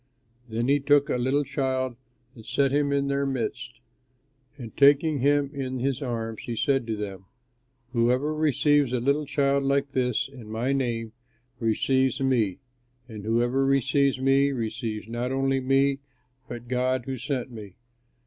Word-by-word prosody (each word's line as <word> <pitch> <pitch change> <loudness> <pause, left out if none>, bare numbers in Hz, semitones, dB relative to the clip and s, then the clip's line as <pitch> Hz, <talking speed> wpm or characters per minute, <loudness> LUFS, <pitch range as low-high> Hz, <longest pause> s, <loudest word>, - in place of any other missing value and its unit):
Then 115 +2 -1
he 140 +1 +3
took 145 0 +3
a - - +1
little 130 +4 +1
child 130 -2 -2 0.4
and 115 - -13
set 135 +4 +1
him 145 0 +1
in 140 0 +1
their 140 0 0
midst. 125 -1 -4 0.8
And 115 -4 -9
taking 145 +2 +4
him 140 +1 +2
in 130 -2 -4
his 130 +1 -1
arms, 115 -4 -4
he 120 - -5
said 130 +1 +1
to 110 - -1
them, 100 -2 -6 0.7
"Whoever 125 +5 +2
receives 145 -2 +2
a 125 - +1
little 140 +4 0
child 140 -1 +1
like 140 0 +1
this, 125 -3 0
in 125 -5 -12
my 115 +5 -1
name, 115 -4 -2 0.5
receives 130 +4 +1
me; 120 -8 +1 0.5
and 110 -4 -9
whoever 120 +4 +1
receives 135 0 +2
me 135 +1 +3
receives 110 -3 -4
not 120 +2 -3
only 135 0 +1
me, 135 +1 +2 0.5
but 120 0 -7
God 130 0 0
who 130 -2 -4
sent 130 -1 -3
me. 105 -5 -10
130 Hz, 155 wpm, -26 LUFS, 120-140 Hz, 0.8 s, taking